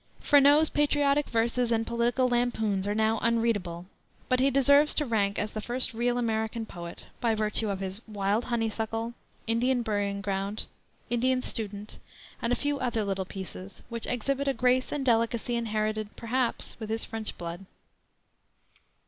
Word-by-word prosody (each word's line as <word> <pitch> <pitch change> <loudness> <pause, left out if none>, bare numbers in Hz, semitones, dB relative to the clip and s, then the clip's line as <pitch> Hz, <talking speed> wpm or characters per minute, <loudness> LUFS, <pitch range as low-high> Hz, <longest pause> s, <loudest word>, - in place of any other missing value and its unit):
Freneau's 290 +2 +6
patriotic 290 -1 +2
verses 235 +1 +1
and 225 0 +2
political 235 +2 +1
lampoons 220 -5 0
are 205 - 0
now 220 0 +2
unreadable; 220 -7 0 0.4
but 255 - +3
he 270 +2 +4
deserves 280 +2 +5
to 300 - +2
rank 205 -5 +1
as 210 +1 -1
the 215 - -3
first 245 +2 0
real 240 +2 0
American 225 -1 -1
poet, 170 -4 -9 0.2
by 230 -2 +2
virtue 215 0 +1
of 195 -1 -3
his 190 +2 -4
Wild 205 +2 0
Honeysuckle, 225 0 -2 0.3
Indian 240 +2 +1
Burying 205 -2 -1
Ground, 200 +1 -2 0.5
Indian 255 +2 +2
Student, 210 -4 -3 0.4
and 235 - 0
a - - +4
few 290 +1 -1
other 230 -4 0
little 195 -1 -1
pieces, 190 0 -8
which 235 -1 -4
exhibit 275 +3 -1
a 275 - +1
grace 255 0 +2
and 285 -2 -2
delicacy 230 0 +1
inherited, 215 -2 -2
perhaps, 240 +1 -2
with 220 -2 -6
his 225 +1 -1
French 225 -1 -5
blood. 175 +2 -6
230 Hz, 155 wpm, -28 LUFS, 210-245 Hz, 0.5 s, Freneau's